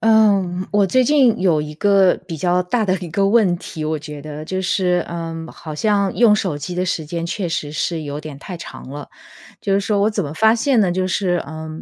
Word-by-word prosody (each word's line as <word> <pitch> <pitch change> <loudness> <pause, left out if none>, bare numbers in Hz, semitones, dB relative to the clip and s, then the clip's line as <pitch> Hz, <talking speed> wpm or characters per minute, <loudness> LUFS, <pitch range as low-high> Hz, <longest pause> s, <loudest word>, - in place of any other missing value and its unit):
嗯， 200 -5 +3
我 205 -1 +4
最 255 +7 +3
近 265 -6 +4
有 170 -5 +2
一 150 0 -7
个 195 +2 +4
比 165 -3 -5
较 175 +3 +1
大 215 +5 0
的 190 - +1
一 175 -1 -7
个 195 +5 +1
问 200 -5 +3
题， 160 -2 -7
我 155 +1 -1
觉 150 0 -8
得， 150 +1 -7
就 185 +4 -3
是， 180 -2 +1
嗯， 165 -1 -5
好 155 - -9
像 200 +3 +1
用 230 -3 +6
手 185 -8 -1
机 180 +5 -5
的 180 +1 0
时 170 -4 -2
间 165 +2 -4
确 180 +2 -3
实 155 -3 -3
是 160 +1 -2
有 145 0 -5
点 150 -2 -8
太 180 +4 -7
长 165 - -10
了， 145 0 -8 0.5
就 200 - -1
是 195 - +3
说 200 0 0
我 210 +2 +3
怎 205 -3 -2
么 145 +1 -6
发 220 +5 +4
现 255 0 +2
呢？ 190 -4 +2
就 185 +1 0
是， 185 -1 0
呃， 160 +1 -7
180 Hz, 250 characters per minute, -20 LUFS, 160-200 Hz, 0.5 s, 用